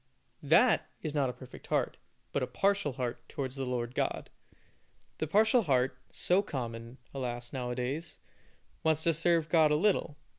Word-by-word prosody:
That - - +4
is 155 - -3
not 140 -4 +1
a - - -4
perfect 130 0 -12
heart, - - 0 0.4
but - - 0
a - - 0
partial 195 -7 +1
heart 125 -2 -3
towards 135 -2 -4
the 135 -2 -3
Lord 120 -1 -2
God. - - -2 0.9
The 155 - -1
partial 220 - +4
heart, 130 - +1 0.2
so 180 +3 +2
common, 120 - -5 0.2
alas, 120 -2 -4
now 125 -2 -3
a 125 - -2
days, 135 +6 -3 0.6
wants 160 0 +2
to 165 - +3
serve 165 0 +2
God 160 -2 +5
a 150 - +3
little. 170 -4 +1
140 Hz, 165 wpm, -31 LUFS, 125-165 Hz, 0.9 s, God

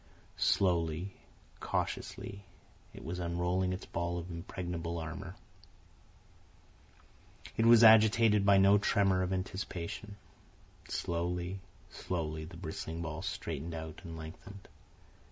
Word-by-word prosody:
Slowly, 85 0 +1 0.5
cautiously, 100 0 -3 0.5
it - - -11
was 90 +2 -4
unrolling 90 +2 0
its 90 - -4
ball 85 +1 -2
of 85 +1 -6
impregnable 85 0 -4
armour. 85 +3 -6 2.2
It 115 - +3
was 120 0 +8
agitated 110 -1 +7
by 100 -1 +6
no 100 +1 +6
tremor 95 -2 +3
of 90 0 -1
anticipation. 95 +2 -4 0.7
Slowly, 90 +2 -2 0.3
slowly, 80 -3 -3
the 85 +1 -11
bristling 80 0 -5
ball 80 -1 -4
straightened 80 +1 -4
out 80 -1 -7
and 85 -2 -7
lengthened. 95 +5 -10
90 Hz, 105 wpm, -32 LUFS, 85-100 Hz, 2.2 s, was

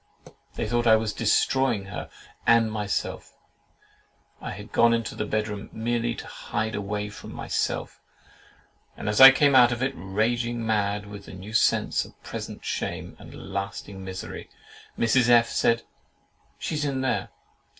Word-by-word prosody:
They - - -2
thought 120 0 0
I 110 - +8
was 110 -1 -1
destroying 115 -1 +1
her 100 - -7 0.4
and 115 -1 +5
myself. 105 -2 -3 1.0
I - - -5
had 105 +3 -8
gone 115 0 +4
into 115 -2 -3
the 105 - -4
bedroom, 105 -1 -3
merely 120 +1 -1
to - - -8
hide 110 0 -4
away 105 0 -3
from 105 - -10
myself, - - -3 1.0
and - - -6
as 105 +4 +2
I 135 - +14
came 140 +1 +4
out 125 -2 +7
of 120 +1 -2
it, 135 +1 0
raging 115 +4 -1
mad 105 -2 0
with 100 -1 -10
the - - -11
new 95 +4 -9
sense 110 - +2
of - - -16
present - - -7
shame - - -4
and 95 - -11
lasting 100 0 -5
misery, 95 -1 -7 0.5
Mrs. 120 +1 +3
F—— 120 -1 +5
said, 115 0 +2 0.7
"She's 150 -1 -3
in 135 -2 -1
there! 130 - -1
110 Hz, 150 wpm, -26 LUFS, 105-120 Hz, 1.0 s, I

